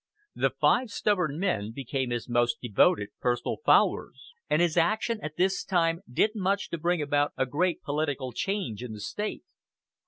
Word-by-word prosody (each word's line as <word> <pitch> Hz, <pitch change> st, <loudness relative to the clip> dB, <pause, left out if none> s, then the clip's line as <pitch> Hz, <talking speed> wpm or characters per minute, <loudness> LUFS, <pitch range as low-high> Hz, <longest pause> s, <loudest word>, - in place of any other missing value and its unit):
The -, -, +1 dB
five 250 Hz, -1 st, +2 dB
stubborn 180 Hz, -8 st, 0 dB
men 115 Hz, -, -1 dB
became 130 Hz, 0 st, -3 dB
his 120 Hz, -1 st, -3 dB
most 120 Hz, -1 st, +1 dB
devoted 105 Hz, -3 st, +2 dB
personal 120 Hz, -1 st, -1 dB
followers; -, -, +2 dB, 0.2 s
and 155 Hz, -, +3 dB
his 170 Hz, -2 st, +2 dB
action 215 Hz, +6 st, +1 dB
at 155 Hz, 0 st, -6 dB
this 190 Hz, +1 st, +1 dB
time 165 Hz, -2 st, +1 dB
did 210 Hz, -, +2 dB
much 200 Hz, -1 st, -1 dB
to 170 Hz, -, -3 dB
bring 170 Hz, -1 st, +1 dB
about 145 Hz, 0 st, +1 dB
a 130 Hz, -, +2 dB
great 170 Hz, +7 st, -1 dB
political 145 Hz, -3 st, -2 dB
change 185 Hz, -, -3 dB
in 125 Hz, -3 st, -6 dB
the 105 Hz, -, -8 dB
State. 210 Hz, -, -4 dB
155 Hz, 165 wpm, -28 LUFS, 125-185 Hz, 0.2 s, and